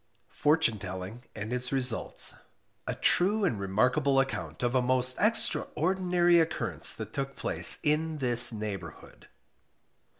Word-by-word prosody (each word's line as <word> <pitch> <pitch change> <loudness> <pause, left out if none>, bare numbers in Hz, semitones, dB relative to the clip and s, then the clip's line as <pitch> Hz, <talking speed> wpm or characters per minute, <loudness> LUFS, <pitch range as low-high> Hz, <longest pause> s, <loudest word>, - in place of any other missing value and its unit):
FORTUNE 150 -8 +1
TELLING 95 +5 -8
AND 110 +2 -6
ITS 125 0 -2
RESULTS. 130 -4 -1 0.5
A - - -3
True 200 +3 +1
and 110 - -2
Remarkable 125 +8 0
Account 85 - -4
of 120 0 -1
a 130 - +2
most 125 0 -1
Extraordinary 180 -4 +1
Occurrence 165 -1 -1
that 110 -1 -9
took 135 0 -5
place - - +3
IN 155 +1 -1
THIS 120 -3 +7
NEIGHBOURHOOD. 105 -3 -8
130 Hz, 125 wpm, -28 LUFS, 110-160 Hz, 0.5 s, THIS